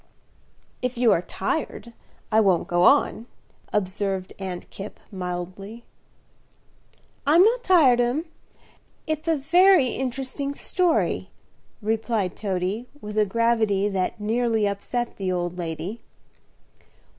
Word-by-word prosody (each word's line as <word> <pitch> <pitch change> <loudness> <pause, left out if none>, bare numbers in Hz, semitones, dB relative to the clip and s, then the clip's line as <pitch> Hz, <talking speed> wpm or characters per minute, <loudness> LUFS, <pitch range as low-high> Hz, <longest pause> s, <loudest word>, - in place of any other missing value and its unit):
"If 250 -1 -2
you 235 -2 +4
are 170 - +3
tired 235 - -4 0.4
I 215 - +5
won't 190 -5 +2
go 175 0 +1
on," 225 +5 +4 0.4
observed 195 -1 -1
Aunt 185 -2 -5
Kipp, 200 +2 -8
mildly. 185 +4 -6 1.4
"I'm 330 +5 +7
not 475 +4 +3
tired, 290 - +5
'm; 250 +7 0 0.8
it's 315 +1 -3
a 325 -1 +3
very 345 0 +5
interesting 265 +3 -3
story," 355 0 0 0.5
replied 220 -3 -1
Toady, 195 +3 -2
with 210 -4 -7
a 215 -1 +3
gravity 220 -2 +2
that 190 +2 -2
nearly 225 0 +1
upset 235 +4 -3
the 190 -2 -2
old 175 0 -2
lady. 175 +6 -5
220 Hz, 110 wpm, -24 LUFS, 190-255 Hz, 1.4 s, I'm